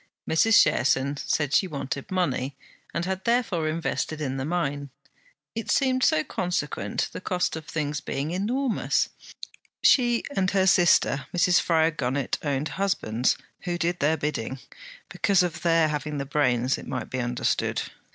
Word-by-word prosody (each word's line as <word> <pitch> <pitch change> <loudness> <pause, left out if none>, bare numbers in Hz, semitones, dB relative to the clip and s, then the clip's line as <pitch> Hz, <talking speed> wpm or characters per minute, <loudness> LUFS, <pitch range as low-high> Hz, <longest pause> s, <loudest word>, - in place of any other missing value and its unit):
Mrs. 210 +7 +5
Cherson 135 +2 +1
said 150 -2 -1
she 190 - +4
wanted 140 -3 -5
money, 140 -7 -1 0.3
and 170 - -2
had 190 0 -3
therefore 220 -10 +1
invested 160 -1 -2
in 135 -3 -2
the 135 - -3
mine. 145 -4 -2 0.6
It 225 -1 -5
seemed 260 -2 +2
so 155 - +3
consequent, 150 - -2
the - - -7
cost 180 -2 -1
of 160 -1 -8
things 150 -1 -2
being 140 +3 -3
enormous! 230 +7 0 0.7
She 240 -3 +4
and 185 -1 +2
her 190 -1 +2
sister 175 -6 +4
Mrs. 175 0 +4
Fryar 160 -1 +2
Gunnett 130 0 -1
owned 145 0 -1
husbands 125 - +1 0.3
who 175 -1 -1
did 175 +1 -1
their 155 +3 +2
bidding, 140 -4 -3 0.5
because 195 -2 +2
of 175 -3 -3
their 165 -2 +3
having 150 0 -3
the 140 - -3
brains, 130 -3 +1
it - - -10
might 130 0 -4
be 130 - -2
understood. 120 0 -1
155 Hz, 150 wpm, -26 LUFS, 140-180 Hz, 0.7 s, Mrs